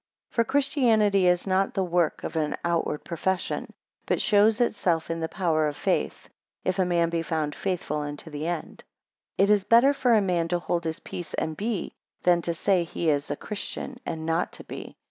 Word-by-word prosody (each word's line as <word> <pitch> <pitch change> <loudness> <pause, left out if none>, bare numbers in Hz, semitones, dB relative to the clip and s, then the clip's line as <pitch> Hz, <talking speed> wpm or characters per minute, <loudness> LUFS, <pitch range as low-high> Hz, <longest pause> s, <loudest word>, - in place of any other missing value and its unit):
17 - - -32
For 230 -1 +1
Christianity 225 -9 +3
is 180 0 +3
not 195 0 +1
the 195 - +1
work 175 -2 0
of - - -5
an 150 -2 0
outward 170 -3 0
profession; 185 +2 -2 0.4
but - - +1
shows 210 +1 +4
itself 180 -9 +1
in 165 - -2
the 160 0 -2
power 160 -5 +1
of 145 - -4
faith, - - -1 0.4
if 185 0 0
a 185 - +4
man 170 -1 +1
be 170 -1 0
found 155 -3 -2
faithful 180 -5 -2
unto 145 +2 -6
the 150 +2 -4
end. 175 -2 -4 0.5
18 - - +4
It 205 +1 +5
is 205 -2 +2
better 235 +7 +5
for 250 -4 +3
a - - +6
man 180 -4 +1
to 175 +1 +1
hold 175 -1 -2
his 160 -1 -3
peace, 175 - -6
and 160 0 -2
be; 210 0 -3 0.3
than 175 -1 +4
to 170 - -1
say, 185 +1 +2
he 165 -1 0
is 145 -1 -1
a - - -1
Christian, 245 +4 -6
and 160 -7 -4
not 165 +1 0
to - - -6
be. - - -9
175 Hz, 205 wpm, -26 LUFS, 165-205 Hz, 0.5 s, a